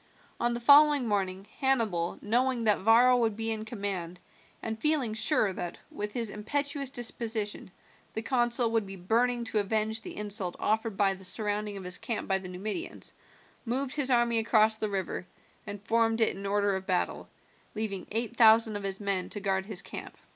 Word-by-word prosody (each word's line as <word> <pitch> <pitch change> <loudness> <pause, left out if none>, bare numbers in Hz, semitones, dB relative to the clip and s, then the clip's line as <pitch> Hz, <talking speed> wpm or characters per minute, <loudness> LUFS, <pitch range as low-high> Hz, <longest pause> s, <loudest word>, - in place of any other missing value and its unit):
On 240 0 +1
the - - -3
following 285 +1 +6
morning 195 -2 -1
Hannibal, 225 -11 0
knowing 245 +2 +1
that 210 -2 +4
Varro 235 +5 +5
would 225 -3 +1
be 225 +1 -1
in 220 0 -3
command, 195 -6 -4 0.4
and 220 0 -5
feeling 290 -7 +2
sure 215 -2 +2
that, 175 -1 -6
with 210 0 -5
his 230 -4 -2
impetuous 280 +6 -3
disposition, 225 -5 -2 0.5
the 220 - -3
consul 240 -1 +2
would 225 -3 0
be 195 - -7
burning 235 +6 0
to 225 -2 -1
avenge 220 +2 0
the - - -9
insult 205 -3 -1
offered 220 -1 -1
by 195 -2 +3
the 190 0 -12
surrounding 210 +2 0
of 195 - -8
his 180 0 -3
camp 230 - -4
by 190 -1 +1
the 185 -1 -9
Numidians, 210 - -5 0.5
moved 260 +3 -2
his 285 -3 +2
army 235 -2 +3
across 220 -1 +4
the 215 -1 -2
river, 190 -2 -4 0.4
and 205 0 -7
formed 225 0 +2
it 225 - +2
in 195 +1 -6
order 200 0 +1
of 190 0 -6
battle, 185 -2 -1 0.5
leaving 210 -3 -3
eight 230 +2 -2
thousand 225 -1 +6
of - - -7
his 195 -1 -3
men 200 -3 -1
to 205 - -4
guard 190 -1 -1
his 200 -4 -2
camp. - - -8
220 Hz, 185 wpm, -29 LUFS, 200-235 Hz, 0.5 s, following